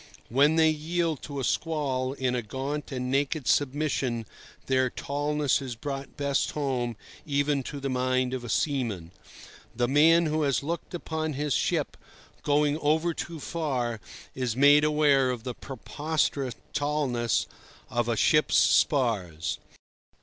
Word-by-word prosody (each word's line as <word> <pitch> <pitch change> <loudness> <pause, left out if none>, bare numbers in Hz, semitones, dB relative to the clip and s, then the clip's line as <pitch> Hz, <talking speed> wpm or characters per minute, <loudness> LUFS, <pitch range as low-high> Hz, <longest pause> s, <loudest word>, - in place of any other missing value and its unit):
When 145 +6 +4
they 160 -1 +5
yield 160 0 -1
to 140 -2 -6
a - - -2
squall 135 -4 -1
in 130 -2 -1
a 125 - 0
gaunt 135 +7 -4
and 125 -1 -3
naked 140 +1 0
submission, 135 -2 0 0.4
their 130 -1 +2
tallness 145 +1 0
is 130 -3 -5
brought 135 +3 -6
best 140 -1 0
home 125 -6 -2 0.3
even 145 -1 +1
to 140 +2 -6
the 140 - -3
mind 130 0 0
of 130 -2 -3
a 120 - -7
seaman. 115 - -1 0.6
The 120 +1 +1
man 160 +5 +5
who 155 0 0
has 140 -2 +1
looked 170 +3 -4
upon 160 -2 -3
his 145 0 -1
ship - - 0 0.4
going 145 +1 +2
over 160 +3 +1
too 165 0 -6
far 130 -8 -2 0.3
is 125 -4 -2
made 145 +3 +6
aware 145 -3 +3
of 125 -3 -3
the 125 -1 -4
preposterous 140 0 -2 0.2
tallness 140 -6 0 0.4
of 120 0 -1
a 115 - 0
ship's 150 +7 +3
spars. 95 - +2
140 Hz, 140 wpm, -27 LUFS, 125-150 Hz, 0.6 s, made